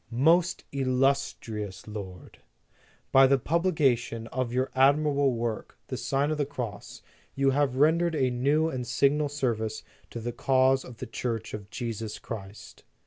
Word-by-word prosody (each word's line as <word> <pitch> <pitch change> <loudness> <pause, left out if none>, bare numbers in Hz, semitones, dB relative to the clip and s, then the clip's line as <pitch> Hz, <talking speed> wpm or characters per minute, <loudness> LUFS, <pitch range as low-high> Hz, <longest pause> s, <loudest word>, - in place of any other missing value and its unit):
MOST 165 +9 +2
ILLUSTRIOUS 130 -7 -1
LORD: 95 -5 -9 0.7
"By 135 0 +7
the 135 +1 +4
publication 135 -8 +1
of 130 -2 -2
your 130 +2 -1
admirable 140 0 +3
work, 115 -2 -4
The - - -3
Sign 140 +2 0
of 155 - -2
the 145 - +2
Cross, 120 -7 -7 0.3
you 135 0 +3
have 140 -2 +1
rendered 165 +4 +3
a 130 -4 +1
new 140 +6 +2
and 130 -6 -4
signal 140 +4 +2
service 115 -6 -2 0.3
to 115 - -6
the 120 +1 -4
cause 130 +1 +3
of 125 -3 -11
the - - -6
Church 115 -1 -4
of 100 -2 -7
Jesus 110 -1 -5
Christ. 100 -2 -9
130 Hz, 145 wpm, -27 LUFS, 115-140 Hz, 0.7 s, By